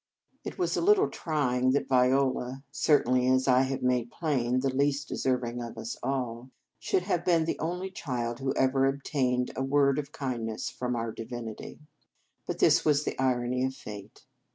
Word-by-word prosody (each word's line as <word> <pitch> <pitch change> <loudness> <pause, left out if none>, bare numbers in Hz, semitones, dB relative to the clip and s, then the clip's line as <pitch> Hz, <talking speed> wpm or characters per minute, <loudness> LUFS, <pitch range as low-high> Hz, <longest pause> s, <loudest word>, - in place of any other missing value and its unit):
It - - -6
was 360 - 0
a - - 0
little 410 +3 +4
trying 130 -5 0
that 140 - 0
Viola 130 0 +1
certainly, 130 -4 +3
as 130 +1 +3
I 130 0 +5
have 135 0 -2
made 125 -2 +1
plain, 130 -6 0
the 135 -1 0
least 140 +1 +1
deserving 125 -2 -1
of 115 -1 -7
us 115 - -5
all 125 -2 -3 0.3
should 180 - 0
have 180 -3 -1
been 170 -3 +3
the - - -2
only 180 +4 -3
child 120 -8 -3
who 135 0 -1
ever 135 0 +3
obtained 135 -2 0
a - - -2
word 140 +1 +2
of 145 0 -6
kindness 120 -6 -4
from 125 -1 -3
our 115 -1 -2
divinity. 115 +3 -7 0.7
But - - -3
this - - +4
was 150 -1 +3
the - - -3
irony 125 -1 +1
of 130 0 -1
fate. 105 -5 -10
130 Hz, 175 wpm, -28 LUFS, 125-140 Hz, 0.7 s, I